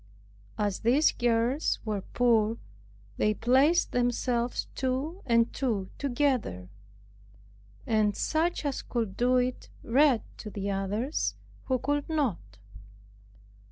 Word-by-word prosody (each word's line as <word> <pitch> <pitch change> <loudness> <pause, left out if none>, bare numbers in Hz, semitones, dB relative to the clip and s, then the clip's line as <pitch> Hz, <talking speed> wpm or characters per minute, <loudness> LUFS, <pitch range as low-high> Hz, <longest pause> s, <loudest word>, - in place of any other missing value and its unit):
As 205 -2 -1
these 260 +7 +4
girls 240 +4 +1
were 210 -3 -2
poor, 230 0 +2 0.6
they 210 0 +2
placed 270 +10 +3
themselves 245 0 0
two 270 +8 -2
and 230 -1 +3
two 220 -8 -2
together, 250 - -1 1.2
and 215 -2 +1
such 320 0 0
as 280 -2 -1
could 225 -6 -3
do 250 +1 +2
it 250 0 -1
read 265 0 +3
to 215 - -7
the 200 -1 -3
others 205 +9 -1 0.3
who 260 - +1
could 290 +4 -2
not. 205 - -2
240 Hz, 110 wpm, -28 LUFS, 215-270 Hz, 1.2 s, these